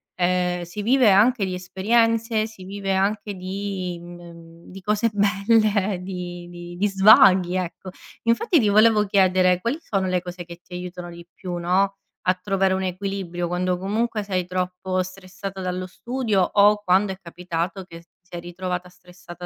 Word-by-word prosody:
Ehm, 180 0 0
si 175 +5 -6
vive 250 +1 +4
anche 215 +3 +4
di 185 - -4
esperienze, 225 +4 +1
si 215 -4 -13
vive 195 0 -3
anche 205 +2 0
di 185 -1 -4
mhmm, 170 -1 -13
di 190 +1 -10
cose 210 +3 +1
belle, 205 -1 +2
di 180 -2 -6
di 175 0 -9
di 205 +3 +2
svaghi, 195 -2 +6
ecco. 185 +1 -4 0.3
Infatti 305 - +2
ti 215 -5 +2
volevo 215 +1 +5
chiedere: 185 -2 +3
quali 235 +8 -1
sono 195 -12 -1
le 180 -1 0
cose 180 0 -7
che 170 0 -10
ti 180 - -15
aiutano 180 0 -7
di 170 0 -11
più, 180 -2 -6
no, 190 +3 +1 0.3
a 185 - +5
trovare 195 0 0
un 190 - -2
equilibrio 185 -2 -3
quando 180 +1 -1
comunque 215 +3 -1
sei 185 -3 -2
troppo 185 +1 -2
stressata 190 +1 -7
dallo 185 0 -3
studio, 235 0 -1
o 205 +3 +4
quando 190 +1 +3
è - - -12
capitato 180 +1 -4
che 170 -2 -12
ti 170 - -28 0.2
sei 175 - -6
ritrovata 180 +1 -5
stressata 180 0 -12
185 Hz, 165 wpm, -23 LUFS, 180-205 Hz, 0.3 s, svaghi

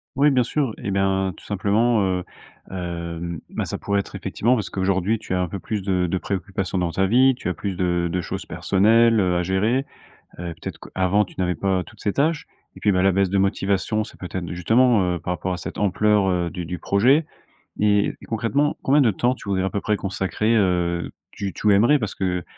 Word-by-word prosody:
Oui 145 +3 +4
bien 130 -3 +3
sûr 135 -3 -1
et 100 - -4
ben 95 -1 +1
tout - - -16
simplement 105 +2 +1
heu, 90 -1 0 0.5
hem, 85 -2 -5
ben - - -3
ça - - -5
pourrait 100 0 0
être - - -6
effectivement, 120 +4 0
parce 110 -6 -1
qu'aujourd'hui 95 +3 0
tu 95 - -6
as 90 - +1
un 90 - 0
peu 100 - -5
plus 105 +2 -4
de 90 -2 0
de 95 +2 -1
préoccupations 95 0 -3
dans 90 -2 0
ta 95 +2 +1
vie, 130 +5 +5
tu 105 - -4
as - - -2
plus 100 -2 -4
de 85 -1 0
de 90 - -1
choses - - -5
personnelles, 115 +3 +3
heu 90 -3 +2
à - - +1
gérer. 105 +9 0 0.5
Heu, 85 -1 -4
peut-être - - -7
qu'avant 95 +3 +1
tu - - -16
n'avais 90 -1 0
pas 95 +1 0
toutes 110 -1 -17
ces 100 - -1
tâches. 150 +1 0 0.3
Et - - -13
puis, 105 - +3
bah 90 - +2
la 95 0 +4
baisse 95 -1 +1
de 100 - +1
motivation, 100 +1 0
c'est - - -14
peut-être 90 -1 -5
justement 105 +1 +3
heu, 85 - -3
par 85 - -3
rapport 90 +2 -3
à 90 - -2
cette - - -7
ampleur 105 0 +2
heu, 90 -2 0
du 90 -1 -6
du 90 +1 -5
projet. 130 +10 +3 0.6
Et 105 -1 +2
et - - -13
concrètement, 120 +7 0
combien 140 +3 +4
de 115 -5 +3
temps 120 +7 +1
tu 100 - -11
voudrais 95 -1 0
à 95 - -1
peu 100 - -2
près 105 -1 0
consacrer 100 +3 -1
heu, 90 -3 +1 0.2
tu 100 -1 -4
tu 105 -1 +2
aimerais? 120 +9 +5
Parce 110 -5 -4
que, 90 -2 -2
95 Hz, 225 wpm, -23 LUFS, 90-110 Hz, 0.6 s, vie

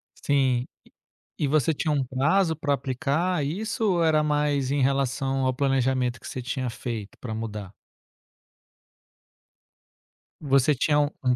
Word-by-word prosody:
Sim, 130 -3 +1 0.7
e - - -1
e 140 - +2
você 155 +1 +2
tinha 155 +2 -1
um 140 -3 +1
prazo 160 +7 +2
para 145 -2 -1
aplicar 145 +5 -1
isso 220 +9 -2
ou 170 -2 +2
era 155 -1 +3
mais 145 -3 +1
em 145 - +1
relação 135 0 0
ao 130 - +2
planejamento 130 -2 +1
que - - -9
você 130 - -5
tinha 130 0 -3
feito 115 -3 -6
para 110 -3 -5
mudar? 105 -4 -5 2.7
Você 140 -1 +3
tinha 145 +3 +2
u 145 0 +2
um 125 -1 +3
140 Hz, 145 wpm, -25 LUFS, 130-150 Hz, 2.7 s, era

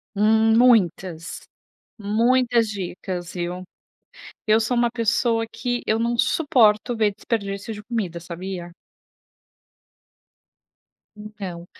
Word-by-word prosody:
Hum, 220 +2 +4
muitas, 185 -8 +2 0.6
muitas 235 +2 +2
dicas, 180 -2 -5
viu. 180 +1 -4 0.8
Eu 215 +1 +5
sou 240 +3 0
uma 240 0 +3
pessoa 230 -1 +1
que 245 -1 -3
eu 220 +1 +1
não 235 +1 0
suporto 240 -6 +3
ver 215 -2 +1
desperdício 205 -1 -4
de 210 0 -9
comida, 200 -8 -3
sabia? 175 +1 -7 2.5
Então, 200 -5 -8
215 Hz, 95 wpm, -23 LUFS, 185-230 Hz, 2.5 s, Eu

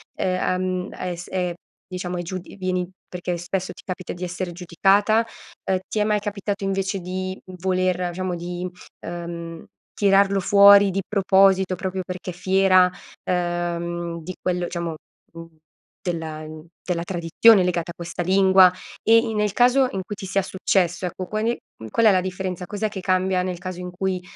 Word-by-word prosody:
è, 185 0 0
uhm, 185 0 -2
hai 180 -1 -4
s 175 +1 -9
è 180 -2 -1 0.3
diciamo, 180 -1 -4
è - - -2
giud 185 +2 -5 0.2
vieni 185 -2 -1 0.2
perché 180 -1 -4
spesso 185 +2 -3
ti - - -15
capita 185 -1 -5
di 175 +1 -8
essere 180 0 -4
giudicata? 195 +6 +3 0.4
Ehm, 185 -1 +1
ti 215 - -2
è - - +3
mai 210 0 +1
capitato 205 -1 -4
invece 195 0 -1
di, 185 +1 -4
mhmm, 185 -1 -10
voler 185 0 0
diciamo 185 0 -2
di, 175 +1 -4 0.3
ehm, 170 -1 -6 0.4
tirarlo 200 -1 +4
fuori 200 +1 +7
di 195 +2 -1
proposito 190 -2 +3
proprio 190 0 -3
perché 185 0 -6
fiera, 185 +1 +4 0.3
ehm, 175 -1 -2
di 185 - -6
quello, 180 -1 -1
diciamo, 170 -2 -4 0.4
uhm, 165 -1 -12 0.4
della 160 -3 -4 0.4
della 170 -2 -2
tradizione 185 +4 +4
legata 170 -1 -1
a - - -11
questa 170 0 -5
lingua? 190 0 +6 0.3
E 230 +1 +6
in 225 -1 +1
nel 210 -1 +1
caso 250 +4 +4
in 190 - -3
cui 210 - -5
ti 195 - -8
sia 195 +1 +1
successo, 185 -1 0
ecco, 185 +1 -4
quale, 220 +3 -1 0.2
mhmm, 110 - -9
qual 230 - +2
è 215 - +8
la 185 - +3
differenza? 185 -1 -4
Cos'è 210 +1 -2
che 195 -2 -6
cambia 185 0 +1
nel 185 -1 -3
caso 185 0 -6
in 180 - -5
cui, 185 0 -2
185 Hz, 170 wpm, -23 LUFS, 175-195 Hz, 0.4 s, è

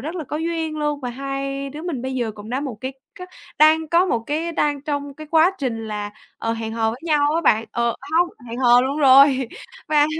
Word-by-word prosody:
rất 315 +7 -5
là 325 -4 -4
có 300 - -4
duyên 325 -1 -2
luôn 295 -1 -1
và 250 -2 -4
hai 275 +1 -4
đứa 300 +3 -8
mình 305 -9 -4
bây 260 0 -3
giờ 240 -3 -1
cũng 210 +1 -10
đã 260 +3 -1
một 265 -7 -5
cái 260 +1 -4 0.3
c - - -8 0.4
đang 310 +1 +5
có 345 +3 +3
một 235 -9 0
cái 325 +3 -2
đang 290 -3 0
trong 285 -2 -4
cái 310 +1 -10
quá 325 +2 +5
trình 225 -5 -3
là, 205 -1 -4 0.3
ờ, 225 - -1
hẹn 225 -1 -4
hò 225 -1 0
với 240 - -8
nhau 300 -2 +2
á 335 - +2
bạn. 225 -7 +3
Ờ, 235 -1 0 0.2
hông 350 0 +3 0.2
hẹn 235 +2 -6
hò 245 -1 +6
luôn 270 +3 -1
rồi 270 -2 +6 0.4
và 300 -1 +4
275 Hz, 235 wpm, -21 LUFS, 245-310 Hz, 0.4 s, hò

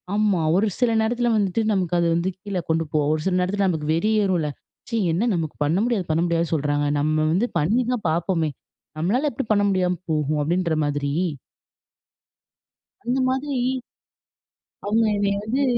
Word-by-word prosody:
ஆமா. 205 -4 +2
ஒரு 205 +4 +3
சில 245 -2 +3
நேரத்தில 240 +2 +1
வந்துட்டு 205 0 +1
நமக்கு 180 -3 0
அது 170 - +2
வந்து 170 +2 0
கீழ 200 -1 -4
கொண்டு 165 0 +2
போவும். 150 -1 +1
ஒரு 155 - -1
சில 185 - +1
நேரத்தில 195 +2 +1
நமக்கு 160 -4 -1
வெறி 210 +7 +1
ஏறும்ல. 175 -6 0 0.4
ச்சீ! 230 - -1 0.2
என்ன 205 +9 +1
நமக்கு 160 -3 -3
பண்ண 155 +4 +1
முடியாது, 230 -7 0
பண்ண 160 +1 +2
முடியாதுன்னு 170 -1 0
சொல்றாங்க. 145 -1 0
நம்ம 155 +2 +1
வந்து 190 +8 +2
பண்ணி 210 +12 +2
தான் 235 -6 -4
பார்ப்பமே! 165 0 0 0.5
நம்மளால 230 - +1
எப்பிடி 225 - -4
பண்ண 205 -1 +3
முடியாம 180 -2 +1
போகும்? 150 -1 0
அப்பிடின்ற 170 +2 0
மாதிரி. 145 -1 -1 1.9
அந்த 245 +2 0
மாதிரி 265 +2 -1 1.3
அவுங்க 220 +2 +2
என்னைய 200 0 0
வந்து 255 +6 0
180 Hz, 160 wpm, -23 LUFS, 160-215 Hz, 1.9 s, ஒரு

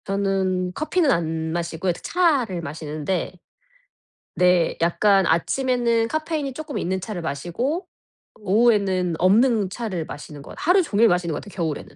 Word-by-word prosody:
저는 190 -2 -1
커피는 310 - +1
안 160 -4 -1
마시고요. 170 +1 -2
이렇게 175 - -8
차를 275 - +1
마시는데 155 +4 -4 1.0
네. 180 -2 +3
약간 195 +3 +3
아침에는 235 +5 +1
카페인이 310 -1 -2
조금 310 +1 -6
있는 190 +2 -1
차를 185 -1 -5
마시고 205 - -3 0.5
오후에는 200 -4 +2
없는 210 +2 +3
차를 190 -6 -4
마시는 145 -1 -9
것 - - -11
하루 365 +4 +4
종일 230 -6 +3
마시는 175 -2 0
것 - - -5
같아요, 205 - -13
겨울에는. 160 -4 -4
190 Hz, 330 characters per minute, -23 LUFS, 170-240 Hz, 1.0 s, 하루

